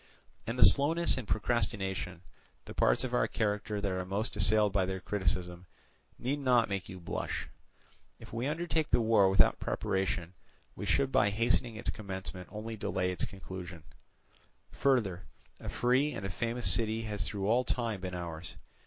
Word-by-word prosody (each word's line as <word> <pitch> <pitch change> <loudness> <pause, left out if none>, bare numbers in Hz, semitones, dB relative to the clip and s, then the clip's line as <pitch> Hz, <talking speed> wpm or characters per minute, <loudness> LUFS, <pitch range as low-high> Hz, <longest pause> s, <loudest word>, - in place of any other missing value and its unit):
"And 115 +2 -2
the - - +8
slowness 165 +4 +5
and 130 -5 -5
procrastination, 95 -6 -1 0.4
the - - -8
parts - - +3
of 125 -1 -3
our 125 - +3
character 105 -1 -1
that 100 -1 -1
are 95 0 -2
most 100 +5 -3
assailed 105 0 +3
by 95 -2 +3
their 95 +1 -2
criticism, 90 -2 -2 0.5
need 140 +4 -2
not 125 -4 +3
make 100 -2 -3
you 95 - -8
blush. 85 - -4 0.7
If - - -13
we 120 +3 -1
undertake 160 0 -1
the - - +4
war 110 -4 +4
without 95 -1 +4
preparation, 95 -2 -1 0.4
we - - -5
should 135 -1 +2
by 100 - +4
hastening 115 +2 +1
its 110 - -2
commencement 95 -3 -7
only 110 +1 -5
delay 90 -3 -1
its 90 -2 -1
conclusion: 90 -3 -8 0.9
further, 115 -10 +1 0.4
a - - -6
free 130 +5 +2
and 95 - -5
a 95 - -3
famous 120 +5 -3
city 110 -1 +2
has 105 -4 -2
through 100 -2 -3
all 120 +5 +3
time 115 -6 -2
been 90 -1 -4
ours. 85 -1 -6
105 Hz, 165 wpm, -31 LUFS, 95-120 Hz, 0.9 s, the